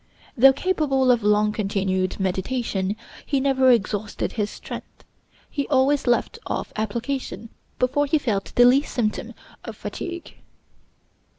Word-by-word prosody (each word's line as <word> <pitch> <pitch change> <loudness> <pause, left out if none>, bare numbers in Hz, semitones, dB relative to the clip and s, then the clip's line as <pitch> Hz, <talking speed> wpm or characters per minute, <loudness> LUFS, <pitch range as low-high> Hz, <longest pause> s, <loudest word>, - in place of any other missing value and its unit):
Though 270 +1 +8
capable 275 -5 +1
of 240 -2 +2
long 210 0 +3
continued 195 -3 -1
meditation, 195 +1 -1 0.3
he 280 - 0
never 265 -1 +3
exhausted 215 -3 0
his 210 -2 -2
strength; - - -9 0.4
he 280 -2 -3
always 275 0 +2
left 240 - +1
off - - -4
application 230 +2 -3 0.3
before 275 +3 +1
he 310 +3 +3
felt 215 -9 -1
the 245 - +7
least 270 +4 +3
symptom 215 -4 -2 0.3
of - - -7
fatigue. 345 -1 -6
245 Hz, 125 wpm, -23 LUFS, 210-270 Hz, 0.4 s, Though